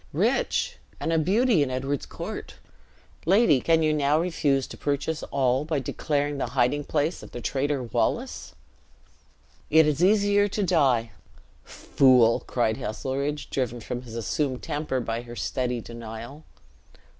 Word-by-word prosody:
Rich, - - 0 0.2
and 165 - -1
a 165 - +3
beauty 205 - +3
in 140 - +1
Edward's 135 +2 -3
court! - - -7 0.7
Lady, 190 - +5
can 165 -1 +3
you 155 0 +2
now 150 0 +2
refuse 150 -6 +1
to - - -10
purchase 145 +2 -2
all, 130 0 +1
by 155 0 -1
declaring 145 +1 -2
the - - -1
hiding 130 +4 +2
place 155 +3 -1
of - - -11
the - - -5
traitor 140 +2 -1
Wallace?" 115 - -2 1.1
"It 160 +1 +6
is 150 +2 +1
easier 205 +1 +4
to 205 +1 -2
die!" 135 - +2 0.5
"Fool!" 125 -4 +3
cried 110 -3 0
Heselrigge, 140 +5 -3
driven 120 -3 -2
from 120 +2 -5
his 115 -2 -10
assumed 130 +3 -2
temper 145 -3 -2
by 115 0 -3
her 120 0 -10
steady 125 -1 -2
denial. 115 +6 -9
140 Hz, 145 wpm, -26 LUFS, 125-155 Hz, 1.1 s, It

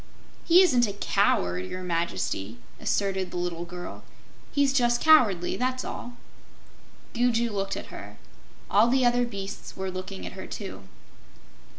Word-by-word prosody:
"He 355 +3 +7
isn't 250 -10 +4
a 200 - -4
coward, 90 - +1
Your 185 - -6
Majesty," 165 - -2 0.2
asserted 190 -2 0
the - - -6
little 175 -1 -3
girl, 175 0 -8 0.5
"He's 280 -2 +2
just 240 -3 +3
cowardly, 225 - +4
that's 255 +1 -1
all." 245 0 -7 1.0
Gugu 235 -1 +1
looked 195 -1 -2
at - - -9
her. - - -9 0.5
All 230 - +4
the 255 +1 +3
other 245 0 +3
beasts 200 -4 -7
were 190 0 -3
looking 185 +1 -6
at - - -6
her, 190 - -8
too. 190 - -7
200 Hz, 145 wpm, -27 LUFS, 180-245 Hz, 1.0 s, He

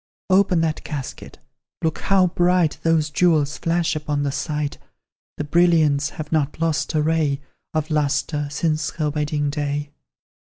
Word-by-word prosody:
Open 185 -3 +4
that 160 -1 -1
casket 145 -5 -7 0.5
look 160 -1 0
how 195 -2 +3
bright 175 -2 +2
Those 160 -2 +2
jewels 150 -2 +2
flash 170 -1 0
upon 150 -1 -2
the 140 - 0
sight; 150 0 -3 0.6
The - - -2
brilliants 155 -3 +3
have 150 -1 -6
not 150 -2 0
lost 160 -1 0
a 150 - +2
ray 155 -3 +1 0.4
Of 155 0 -1
lustre, 150 0 0
since 155 +1 0
her 150 -2 0
wedding 145 -1 -1
day. 145 0 -3
155 Hz, 145 wpm, -22 LUFS, 145-165 Hz, 0.6 s, Open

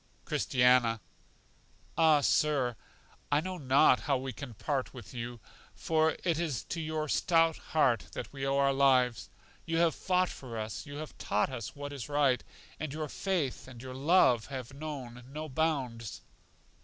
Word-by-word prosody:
Christiana: 125 -3 +3 1.0
Ah, 160 -3 +5
Sir, 140 -5 +2 0.6
I 145 - +4
know 185 +2 -4
not 130 -2 +5
how 140 -2 +1
we 130 0 -5
can 125 -2 -8
part 135 +3 -2
with 120 -3 -10
you, 120 0 -5 0.4
for 160 0 +1
it 170 -3 +1
is 155 -8 -2
to 165 - -4
your 155 -1 -2
stout 165 0 +3
heart 130 -8 +1
that - - -6
we 135 -1 -6
owe 135 0 +1
our 140 0 +3
lives. 125 -6 +3 0.3
You 165 0 -1
have 165 -2 +4
fought 185 +3 +1
for 120 -4 -8
us, 110 +7 -5
you 145 - -8
have 155 0 -7
taught 105 +5 0
us 115 -6 -6
what 145 0 -6
is 140 -1 -6
right, 140 -4 +2 0.4
and 155 -2 -3
your 155 0 -4
faith 170 -11 -2
and 125 -2 -11
your 130 +1 -7
love 135 -4 +4
have 130 -2 -6
known 135 -5 -7
no 155 +3 -6
bounds. 130 -7 -2
140 Hz, 165 wpm, -31 LUFS, 125-155 Hz, 1.0 s, Ah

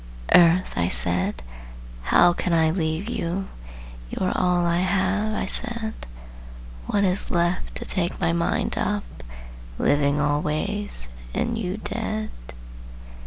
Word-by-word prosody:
"Earth," 175 +1 +5
I 85 0 +1
said, 85 -9 +1 0.6
"how 175 - +5
can 175 0 -1
I 160 -1 +4
leave 160 +2 -1
you?" 190 -4 -2 0.6
"You - - -7
are - - +1
all 180 -1 +2
I 170 0 +2
have," 200 +3 +1
I - - -1
said; 230 +1 -1 0.9
"What 200 - +1
is 190 0 +1
left 175 +1 0
to - - -5
take 180 -2 -2
my 165 - +1
mind 170 0 0
up, 205 -1 0 0.7
Living 145 0 +2
always, 150 - -1 0.3
and 235 - 0
you 195 -3 -3
dead?" 215 0 -3
180 Hz, 125 wpm, -24 LUFS, 160-205 Hz, 0.9 s, Earth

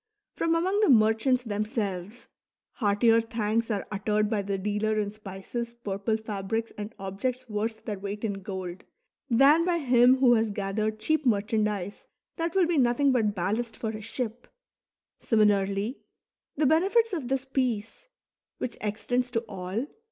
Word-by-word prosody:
from 330 0 +1
among 375 +5 +1
the 425 - +4
merchants 225 +2 +4
themselves, 210 -1 -3 0.4
heartier 225 +1 +3
thanks 225 0 -1
are 205 -3 -1
uttered 210 +1 0
by 210 -2 +1
the 200 0 -2
dealer 210 +2 0
in 205 -1 -1
spices, 215 +3 -6
purple 210 -1 -2
fabrics, 220 +1 -3
and 210 +2 -7
objects 240 +7 -3
worth 220 +1 -3
their 205 -3 -4
weight 200 +2 -5
in 215 -2 0
gold, 185 -2 -6 0.5
than 275 +7 +6
by 350 0 +1
him 250 -3 +5
who 255 -2 +5
has 225 -1 +2
gathered 210 +2 -2
cheap 310 +6 +1
merchandise 210 -4 0 0.3
that 335 +1 -2
will 380 -2 +5
be 335 -3 +1
nothing 255 +3 +3
but 220 -5 +1
ballast 215 +6 -2
for 220 - -3
his 215 -1 -7
ship; 235 0 -5 0.7
similarly, 205 +1 +1 0.6
the 300 - +1
benefits 390 - +3
of 305 -8 -2
this 265 +1 -1
peace, 255 - -2 0.5
which 240 - -4
extends 245 +4 -1
to 230 -2 -1
all. 200 +1 -4
220 Hz, 150 wpm, -27 LUFS, 205-250 Hz, 0.7 s, than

